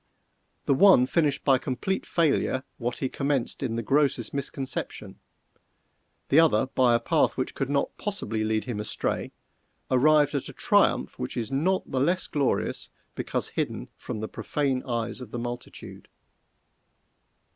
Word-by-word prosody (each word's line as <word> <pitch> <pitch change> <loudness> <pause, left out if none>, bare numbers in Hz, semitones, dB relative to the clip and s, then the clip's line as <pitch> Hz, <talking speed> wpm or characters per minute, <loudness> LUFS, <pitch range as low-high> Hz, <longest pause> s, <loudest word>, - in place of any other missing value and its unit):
The - - +3
one 160 -4 +6
finished 145 0 +1
by 135 -3 +5
complete 135 +10 -2
failure 145 -5 +1 0.2
what 120 0 -2
he 135 - -1
commenced 135 -1 -1
in 115 - -2
the 115 - -2
grossest 135 -1 +1
misconception; 140 -1 -5 1.1
the 145 - +6
other, 150 -9 +4
by 130 -2 +3
a - - +3
path - - +1
which - - -2
could 135 - -3
not 140 -1 0
possibly 115 - -2
lead 110 0 0
him 120 -5 -4
astray, 105 - -2 0.6
arrived 145 +3 +4
at 140 - -2
a - - -9
triumph - - +2
which 65 - -4
is 120 +1 -3
not 175 +8 0
the 130 - 0
less 175 +7 +1
glorious 140 -3 -1 0.2
because - - -2
hidden - - -3
from 105 - -6
the 110 - -3
profane 135 0 -1
eyes 120 0 -2
of 125 - -8
the 120 - -5
multitude. 120 +1 -7
130 Hz, 150 wpm, -26 LUFS, 120-145 Hz, 1.1 s, one